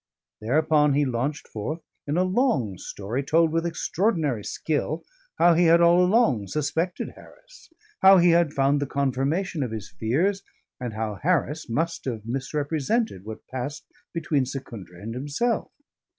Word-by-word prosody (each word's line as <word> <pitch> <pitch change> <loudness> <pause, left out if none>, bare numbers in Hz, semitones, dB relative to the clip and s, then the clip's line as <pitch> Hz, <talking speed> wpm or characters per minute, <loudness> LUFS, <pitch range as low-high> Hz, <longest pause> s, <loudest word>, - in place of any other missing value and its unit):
Thereupon 150 +4 +3
he 145 0 +3
launched 130 +4 -2
forth 150 +10 -5 0.2
in 145 +3 0
a 180 - +4
long 185 - +1
story, 105 +9 -4
told 160 +3 +3
with 165 +1 0
extraordinary 165 - 0
skill, 155 +5 -2 0.3
how 175 - +6
he 175 +2 +3
had 165 +1 +6
all 170 +1 +5
along 180 - +3
suspected 160 - -2
Harris, - - -17 0.3
how 190 0 +8
he 175 -1 +5
had 170 -2 +3
found 140 0 +2
the 145 - -1
confirmation 140 +6 -1
of 130 - -1
his 110 -2 -6
fears, 175 - 0 0.4
and 125 -3 -4
how 110 -2 -3
Harris 160 -3 0
must 165 +8 -2
have 115 -5 -4
misrepresented 145 - -1
what 110 0 -8
passed 130 +4 -5 0.3
between 155 -5 0
Secundra 115 -10 -8
and 110 +4 -6
himself. 145 - -1
145 Hz, 150 wpm, -25 LUFS, 125-170 Hz, 0.4 s, how